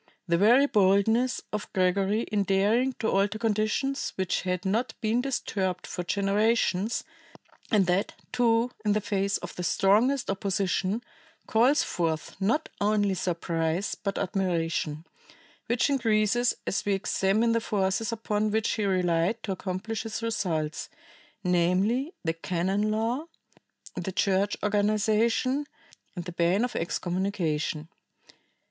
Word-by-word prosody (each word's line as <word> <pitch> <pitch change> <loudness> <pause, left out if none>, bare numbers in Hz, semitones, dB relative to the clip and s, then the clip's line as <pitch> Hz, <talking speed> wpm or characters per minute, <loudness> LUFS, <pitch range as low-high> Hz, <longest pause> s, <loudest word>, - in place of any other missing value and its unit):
The 170 - +2
very 240 +8 +6
boldness 220 +3 +2
of 210 - -4
Gregory 195 +3 +2
in 210 -1 -1
daring 210 +7 +2
to 225 - -3
alter 200 +2 +1
conditions 225 +5 -1
which 190 -1 -1
had 180 +1 -2
not 220 +6 -1
been 225 +2 +1
disturbed 195 -8 -2
for 180 - -4
generations, 205 +2 +1 0.7
and 205 -3 +3
that, 180 +3 0 0.2
too, 235 0 +2
in 210 -2 +2
the 210 - +2
face 200 -1 0
of - - -8
the - - -5
strongest 210 +9 +2
opposition, 195 +2 -1 0.4
calls 245 +6 +3
forth 160 -3 -2
not 230 +11 +1
only 205 -1 +2
surprise, 170 0 -1
but 200 -2 -4
admiration, 170 -5 -1 0.6
which 235 +1 +2
increases 240 -3 +2
as - - -1
we 200 -1 +1
examine 200 +3 +1
the 230 0 +1
forces 210 +1 0
upon 215 -1 -1
which 220 +1 0
he 215 - -1
relied 180 +3 +1
to 200 - -3
accomplish 190 +4 -3
his 225 0 -5
results, 165 -9 -2 0.5
namely, 185 - +1
the 165 -2 0
canon 185 +5 -1
law, 230 +7 -1 0.7
the 180 +2 -3
church 195 +2 +1
organization 215 +6 +1 0.5
and 175 -2 -5
the 180 - -5
ban 175 +5 +2
of 250 - -6
excommunication. 170 -3 -2
200 Hz, 125 wpm, -27 LUFS, 185-225 Hz, 0.7 s, very